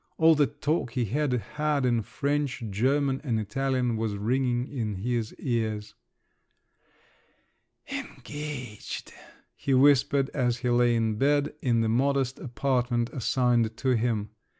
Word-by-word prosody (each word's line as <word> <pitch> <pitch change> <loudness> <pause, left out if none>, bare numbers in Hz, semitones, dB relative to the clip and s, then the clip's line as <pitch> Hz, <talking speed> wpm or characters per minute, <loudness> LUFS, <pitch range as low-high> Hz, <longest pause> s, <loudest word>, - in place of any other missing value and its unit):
All 160 0 +6
the 145 -2 +3
talk 150 -5 -2
he 125 -2 0
had 145 +6 0
had 145 +3 -1
in 120 -2 +2
French, 140 +2 -2
German, 135 +6 +1
and 115 -6 0
Italian 125 +1 -1
was 110 -2 -1
ringing 125 +3 0
in 110 -7 -3
his 115 +3 -2
ears. 110 -4 -2 2.0
"Engaged!" 145 -7 -6 0.4
he 135 - 0
whispered 140 0 +4
as 125 -4 0
he 125 - +2
lay 120 0 +4
in 110 -2 0
bed, 145 +1 +2
in 120 -3 +2
the 115 - +1
modest 135 +2 +1
apartment 125 -2 0
assigned 120 -3 +1
to 130 - -1
him. 115 -3 0
125 Hz, 125 wpm, -27 LUFS, 115-140 Hz, 2.0 s, All